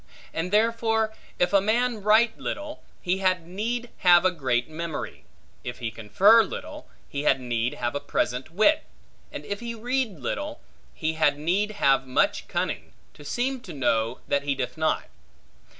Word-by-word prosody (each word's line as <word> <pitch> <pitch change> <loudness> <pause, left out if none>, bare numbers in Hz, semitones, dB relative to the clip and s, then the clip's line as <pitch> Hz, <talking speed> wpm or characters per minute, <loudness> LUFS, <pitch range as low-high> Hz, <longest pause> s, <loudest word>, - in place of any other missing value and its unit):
And 165 +2 -2
therefore, 225 0 +2 0.2
if 180 +2 +1
a 200 - +6
man 230 +2 +1
write 220 +3 +4
little, 300 +1 -5 0.2
he 185 +1 0
had 185 -3 +1
need 230 +7 -3
have 175 0 +6
a 185 - +5
great 130 -7 0
memory; 160 0 -6 0.4
if 125 - -5
he 115 -3 -4
confer 185 - +5
little, 300 +7 -6 0.2
he 140 - -4
had 135 -2 +3
need 120 -1 -1
have 120 -1 -2
a 145 - -1
present 125 -1 -2
wit: 215 - +3 0.5
and - - -7
if 200 0 -4
he 235 -1 -5
read 240 - -1
little, 295 - -4 0.4
he 160 0 -1
had 145 -2 +2
need 190 +8 0
have 135 -8 +2
much 130 - +1
cunning, - - -3 0.2
to 145 - -14
seem 255 - -1
to 180 - -9
know, 120 -3 0
that 140 - +1
he 140 -1 -1
doth 125 -2 -3
not. 160 0 +1
185 Hz, 165 wpm, -26 LUFS, 140-230 Hz, 0.5 s, a